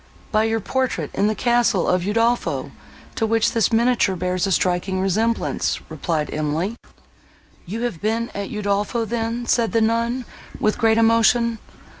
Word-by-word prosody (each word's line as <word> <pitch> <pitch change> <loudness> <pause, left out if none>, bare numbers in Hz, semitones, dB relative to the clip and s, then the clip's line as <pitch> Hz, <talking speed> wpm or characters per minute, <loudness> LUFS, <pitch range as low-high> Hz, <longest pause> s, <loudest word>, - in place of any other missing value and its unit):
"By 215 0 +3
your 225 0 0
portrait 255 - -2
in 200 - +1
the 215 - 0
castle 235 -5 +2
of 180 0 +2
Udolpho, 230 +3 0 0.4
to 225 - -1
which 225 0 +2
this 230 -1 +1
miniature 230 -4 +2
bears 180 +2 -1
a - - -1
striking 185 +1 0
resemblance," 220 +5 0
replied 155 -3 -2
Emily. 155 +8 -1 0.9
"You 220 +6 -4
have 235 -10 -3
been 225 +2 -1
at 200 -1 -4
Udolpho 205 +2 -1
then!" 230 +1 -2
said 235 -1 +1
the 230 - +3
nun, 230 +3 0 0.3
with 215 -1 0
great 225 -1 +3
emotion. 230 0 +3
225 Hz, 150 wpm, -21 LUFS, 195-230 Hz, 0.9 s, By